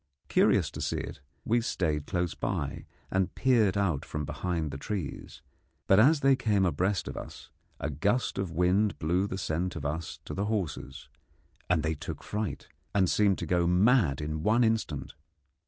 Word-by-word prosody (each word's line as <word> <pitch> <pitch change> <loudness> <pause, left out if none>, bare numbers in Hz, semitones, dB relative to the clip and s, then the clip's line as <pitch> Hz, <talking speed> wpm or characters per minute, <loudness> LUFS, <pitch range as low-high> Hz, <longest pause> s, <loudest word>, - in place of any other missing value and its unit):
Curious - - +3
to - - -7
see - - -1
it, - - -6 0.3
we 120 +2 +2
stayed 80 -10 -1
close 90 -2 -1
by, 70 -1 -3 0.2
and 95 -1 0
peered 110 -7 +3
out 90 -8 +1
from 75 -1 -4
behind 85 -1 -2
the 70 - -6
trees; 90 -7 -5 0.4
but 95 - +5
as 140 +6 +5
they 135 0 +5
came 105 -6 +2
abreast 95 +3 0
of - - -5
us - - -9 0.3
a - - -2
gust 100 - 0
of 95 -2 -1
wind 90 +5 +2
blew 90 +5 +1
the 95 - -4
scent 90 0 -2
of 75 -4 -5
us 80 +3 -3
to - - -6
the 100 - -1
horses, 90 -10 -3 0.6
and 85 -3 +2
they 80 0 0
took 75 - -7
fright 105 -1 -4 0.3
and 95 -3 +3
seemed 100 -3 +3
to - - -4
go 85 -1 +2
mad 90 - +3
in 75 +1 -3
one 110 +7 +3
instant. 110 - -1
90 Hz, 175 wpm, -29 LUFS, 80-105 Hz, 0.6 s, but